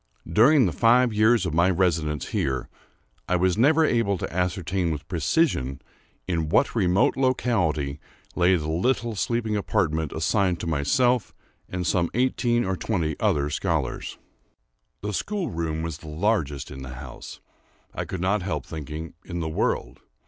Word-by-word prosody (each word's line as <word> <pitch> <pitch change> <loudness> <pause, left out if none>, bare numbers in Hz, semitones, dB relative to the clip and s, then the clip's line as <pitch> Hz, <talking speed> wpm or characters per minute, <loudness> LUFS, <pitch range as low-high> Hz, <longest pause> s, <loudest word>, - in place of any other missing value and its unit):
During 125 - +5
the 90 - +1
five 120 +4 +4
years 110 -1 +4
of 85 - -2
my 85 +3 +4
residence 80 -5 0
here, 65 -2 -1 0.6
I 90 - +3
was 90 0 +2
never 150 +8 +4
able 115 -8 +1
to - - -5
ascertain 90 0 -1
with 75 -3 -4
precision, 85 - 0 0.5
in 80 -4 -1
what 110 - +3
remote 95 -4 +2
locality 90 - 0 0.4
lay 90 +1 +4
the 75 -3 -2
little 115 +7 0
sleeping 110 +1 -1
apartment 80 -7 0
assigned 90 +3 +1
to - - -4
myself 90 - +1 0.3
and 90 -1 -3
some 85 0 +1
eighteen 120 -1 +1
or 95 0 -1
twenty 85 -7 -1
other 75 -9 +1
scholars. 80 -5 -2 0.8
The 105 0 -3
school 190 - -2
room 80 -2 -2
was 85 -2 -4
the 80 - -12
largest 75 - -1
in 65 - -8
the 65 -1 -7
house—I 65 - -10
could 95 - -5
not 100 +2 +1
help 80 -7 -3
thinking, 80 +1 -7
in 85 -1 -5
the 80 -1 -2
world. - - -1
90 Hz, 150 wpm, -25 LUFS, 80-110 Hz, 0.8 s, During